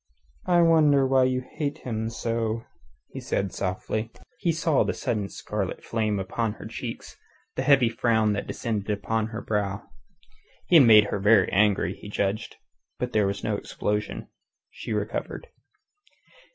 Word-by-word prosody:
"I 175 -1 +4
wonder 150 -4 +5
why 130 -1 +4
you 130 0 0
hate 145 -2 -3
him 110 -2 -2
so," 115 0 -2 0.5
he - - -6
said 100 -1 -2
softly. 110 +4 -3 0.3
He 170 - +1
saw 160 -2 +2
the - - -2
sudden 105 -4 -2
scarlet 105 -3 -4
flame 110 -3 -1
upon 105 +3 -2
her - - -11
cheeks, - - -7 0.4
the - - -1
heavy 135 -4 +5
frown 115 -2 +1
that 105 - -3
descended 110 -4 -3
upon 110 +1 -1
her 110 0 -6
brow. 100 -2 -2 0.8
He 175 - +6
had 135 -6 +7
made 105 -2 +8
her - - -1
very 100 0 +4
angry, 105 0 +2
he 105 - -11
judged. 105 +3 -2 0.4
But 125 0 -4
there 105 -2 +3
was 100 0 -3
no 110 -1 0
explosion. 105 +1 -3 0.4
She - - -8
recovered. 485 - -3
110 Hz, 150 wpm, -26 LUFS, 105-130 Hz, 0.8 s, made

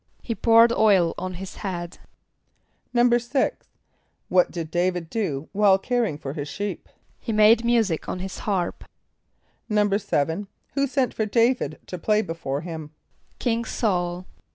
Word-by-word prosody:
=He 230 - -2
poured 230 +1 +5
oil 195 -7 +4
on 185 0 -4
his 190 +2 -8
head.= 175 -4 -5 1.0
=6.= 240 - +3 0.8
What 180 -1 +4
did 165 -2 -6
D[=a]´vid 175 -1 -1
do 160 -10 -2
while 200 -1 +4
caring 230 - -1
for 135 -2 -6
his 145 -2 -5
sheep? 205 +5 -5 0.3
=He 230 - -4
made 215 +2 +5
music 225 -8 +1
on - - -2
his 185 +1 -6
harp.= 190 -4 -2 0.9
=7.= 200 -4 +1 0.3
Who 280 0 +1
sent 265 -1 0
for 220 - -1
D[=a]´vid 230 -6 +1
to 180 - -7
play 215 +5 +2
before 155 -5 -4
him? 160 -3 -7 0.5
=King 235 -2 0
S[a:]ul. 180 -6 -1
195 Hz, 135 wpm, -24 LUFS, 175-230 Hz, 1.0 s, poured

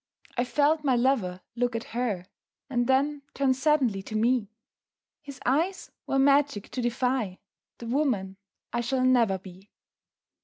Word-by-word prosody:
I 245 - +1
felt 300 +4 +2
my 265 -3 +3
lover 235 -8 +1
look 245 0 0
at 230 - -2
her 225 -7 -1 0.5
And 240 -2 +1
then 280 +2 +2
turn 275 -2 +3
suddenly 265 -7 +2
to 215 +3 -8
me 230 -1 +2 0.7
His 280 -3 -10
eyes 325 +9 0 0.2
were 270 - +1
magic 275 -5 +3
to 255 - -3
defy 240 -4 0 0.4
The 235 - -9
woman 230 -7 0 0.4
I 240 - +1
shall 255 +2 0
never 235 -6 +4
be. 190 +1 -14
250 Hz, 145 wpm, -27 LUFS, 220-275 Hz, 0.7 s, never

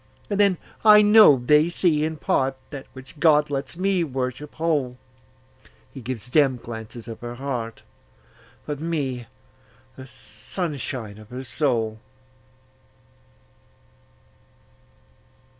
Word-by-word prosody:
And 200 - 0
then 200 -3 +4 0.3
I 210 -1 +8
know 210 -8 +8
they 150 +6 +3
see 165 -3 +1
in 160 0 -2
partThat 135 0 -2
which 130 +3 -12
God 150 -2 +4
lets 135 +1 -3
me 190 -1 +1
worship 130 0 -4
whole:He 130 -3 -6
gives 125 0 -6
them 135 -4 +3
glances 115 0 -9
of 115 - -7
her 120 0 -7
heart, 120 -4 -5 0.8
But 145 -2 -4
me, 140 -7 -3 0.7
the 130 0 -11
sunshine 130 - -5
of 110 0 -14
her 125 +1 -6
soul. 120 -4 -1
135 Hz, 105 wpm, -24 LUFS, 125-155 Hz, 0.8 s, I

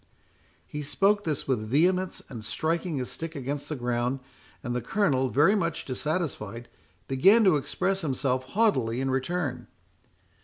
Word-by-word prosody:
He 150 - -6
spoke 200 +8 +2
this 150 -3 -2
with 110 -5 -1
vehemence, 180 +7 +2
and 115 -5 -8
striking 165 - -1
his 125 -1 -3
stick 165 0 -5
against 140 +1 -4
the 155 - -2
ground; 120 +1 -1 0.4
and 120 0 -2
the 125 - -1
Colonel, 135 - +1
very 150 +10 +4
much 170 -5 -1
dissatisfied, 130 - -3 0.4
began 195 - +5
to 190 -6 +5
express 190 +7 -1
himself 130 -3 0
haughtily 130 - +1
in 135 0 0
return. 140 +2 -2
145 Hz, 145 wpm, -27 LUFS, 125-175 Hz, 0.4 s, began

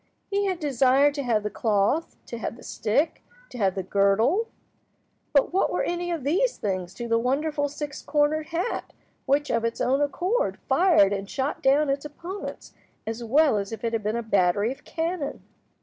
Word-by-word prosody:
He 400 0 +1
had 370 -3 -1
desired 275 -1 +3
to 285 - -3
have 230 -5 +1
the 210 - -3
cloth, 220 +8 +1
to 235 - -7
have 225 - -4
the - - -14
stick, 255 +9 0 0.3
to 245 - -9
have 195 -2 +2
the 190 - -2
girdle, 205 - +2 0.8
but 280 +3 +3
what 380 - +2
were - - 0
any 350 0 -2
of 335 -5 -2
these 365 - +1
things 185 -3 -3
to 240 - -5
the 230 0 +2
wonderful 290 +4 0
six 295 0 -6
cornered 305 +1 +1
hat 340 +8 -3 0.3
which, 285 +2 +2
of 230 -1 +1
its 230 0 -2
own 270 +3 +2
accord, 365 - 0
fired 330 - +4
and 195 0 -4
shot 270 +2 -2
down 285 +3 +4
its 275 0 -1
opponents 340 +7 -7 0.3
as 225 +2 -4
well 270 -1 +3
as 200 +1 -5
if 225 0 -7
it 230 0 -1
had 225 - 0
been 215 +2 -1
a 235 - -2
battery 205 +1 +2
of 270 - -9
cannon! 325 -2 -3
275 Hz, 190 wpm, -25 LUFS, 225-310 Hz, 0.8 s, fired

